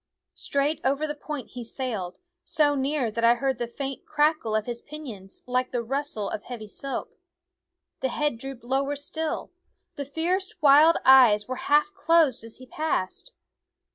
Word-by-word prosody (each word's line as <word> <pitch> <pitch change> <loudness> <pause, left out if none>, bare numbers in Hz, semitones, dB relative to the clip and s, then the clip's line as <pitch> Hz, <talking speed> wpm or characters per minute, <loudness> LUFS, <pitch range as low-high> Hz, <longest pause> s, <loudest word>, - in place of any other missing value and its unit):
Straight 285 +2 -1
over 275 +3 +1
the 295 - -3
point 295 -2 -6
he 245 - -7
sailed, 225 -7 -4 0.3
so 295 -2 +2
near 275 -3 0
that 230 +2 -3
I 235 +1 +6
heard 265 0 -1
the 240 - -2
faint 270 +3 -5
crackle 295 -7 +1
of 215 -1 0
his 240 -1 -5
pinions, 235 -11 -9
like 250 0 0
the 245 -2 -2
rustle 270 -4 -2
of 210 - -4
heavy 235 -4 -7
silk. 275 +6 -5 0.8
The 265 - -1
head 295 -2 -1
drooped 270 -1 -8
lower 270 +3 0
still; 310 +2 -4 0.5
the 285 - -3
fierce, 345 +7 -2
wild 300 +3 +7
eyes 240 -6 +7
were 255 0 -4
half 300 +7 +4
closed 315 - +3
as 225 -1 -9
he 255 - -12
passed. 310 - -3
270 Hz, 165 wpm, -26 LUFS, 240-295 Hz, 0.8 s, wild